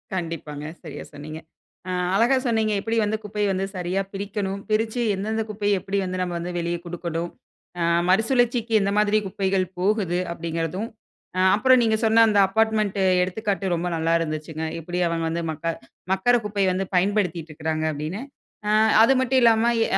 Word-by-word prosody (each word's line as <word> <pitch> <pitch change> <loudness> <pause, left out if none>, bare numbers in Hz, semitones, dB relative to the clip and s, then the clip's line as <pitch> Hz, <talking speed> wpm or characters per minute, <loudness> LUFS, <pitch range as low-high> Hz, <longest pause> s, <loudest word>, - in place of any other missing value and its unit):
கண்டிப்பாங்க 160 -4 -5 0.2
சரியா 150 -3 -7
சொன்னீங்க. 155 +2 -8 0.5
அ - - -1 0.2
அழகா 240 +6 +4
சொன்னீங்க 220 -2 +1
எப்டி 225 +2 -1
வந்து 215 +1 -1
குப்பைய 210 0 -2
வந்து 190 0 -1
சரியா 180 +2 -1
பிரிக்கணும் 200 0 -3
பிரிச்சு 220 +2 0
எந்தெந்த 220 +3 -2
குப்பைய 205 -2 0
எப்டி 195 +2 -3
வந்து 185 0 -3
நாம 180 -1 -2
வந்து 175 +1 -4
வெளியே 170 0 -2
கொடுக்கனும். 170 -1 -4 0.5
அ - - +1 0.3
மறுசுழற்சிக்கு 230 +2 +2
எந்த 200 0 +1
மாரி 210 0 +3
குப்பைகள் 190 0 0
போகுது 190 -2 +1
அப்டிங்கிறதும், 170 +5 -3 0.5
அ - - +1 0.2
அப்பறம் 255 +3 +5
நீங்க 220 -1 +2
சொன்ன 225 +1 +6
அந்த 205 -1 +3
அப்பார்ட்மென்ட் 215 -1 +1 0.2
எடுத்துக்காட்டு 195 0 -1
ரொம்ப 170 +1 -2
நல்லா 165 0 +1
இருந்துச்சுங்க. 155 0 -4 0.2
எப்டி 175 +2 -3
அவங்க 165 0 -1
வந்து 170 +1 -2
மக்க 165 +2 -3 0.4
மக்குற 245 +6 +3
குப்பைய 200 -2 0
வந்து 190 0 -2
பயன்படுத்திட்டு 180 -4 0
இருக்குறாங்க 155 +1 -2
அப்படின்னு. 155 +8 -4 0.5
அ - - +3 0.3
அது 270 - +5
மட்டும் 260 0 +2
இல்லாம 225 -1 +5 0.2
இ - - +5
195 Hz, 160 wpm, -24 LUFS, 170-215 Hz, 0.5 s, சொன்ன